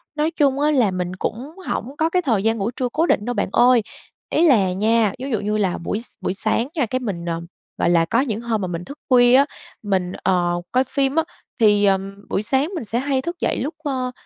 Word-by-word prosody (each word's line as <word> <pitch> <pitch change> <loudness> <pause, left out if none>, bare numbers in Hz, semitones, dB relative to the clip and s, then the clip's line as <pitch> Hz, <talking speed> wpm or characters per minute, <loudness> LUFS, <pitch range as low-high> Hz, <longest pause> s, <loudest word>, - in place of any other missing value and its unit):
Nói 310 +2 0
chung 280 -4 +1
á 300 +1 +3
là 245 -9 +3
mình 180 0 -3
cũng 250 +9 -4 0.2
hổng 265 +5 -3
có 320 +1 +2
cái 360 +1 +1
thời 225 - 0
gian 225 0 +1
ngủ 210 +4 -1
trưa 250 -1 -2
cố 320 +7 +1
định 210 - +1
đâu 245 - -1
bạn 205 - -1
ơi. 245 -1 +5 0.5
Ý 335 +2 +3
là 200 - +4
nha, 215 +1 +2
vú 260 - -4
dụ 230 -6 -1
như 210 +1 -1
là 190 -4 0
buổi 205 +6 -3
s - - -8
buổi - - -1
sáng 225 +4 0
nha, 290 -6 +1
cái 255 +3 -2
mình, 195 -9 -4
ờ, 165 -1 -2 0.4
gọi - - +1
là, 170 -1 +4
có 230 +8 +1
những 230 -5 -2
hôm 230 -3 -1
mà 185 - -2
mình 175 0 -5
thức 280 - -10
khuya 245 -1 +6
á, 275 +2 +6 0.4
mình, 190 -3 0
ờ, 175 -1 +1
coi 255 +1 +3
phim 270 +2 -1
á, 325 - +3 0.4
thì, 210 -2 +4
ờm, 195 0 +1
buổi - - 0
sáng 265 +7 +1
mình 330 - -3
sẽ 230 +3 -1
hay 270 0 0
thức 340 +3 -5
dậy - - 0
lúc, 295 +5 -3
ơ, 260 -4 -2
230 Hz, 250 wpm, -21 LUFS, 195-270 Hz, 0.5 s, khuya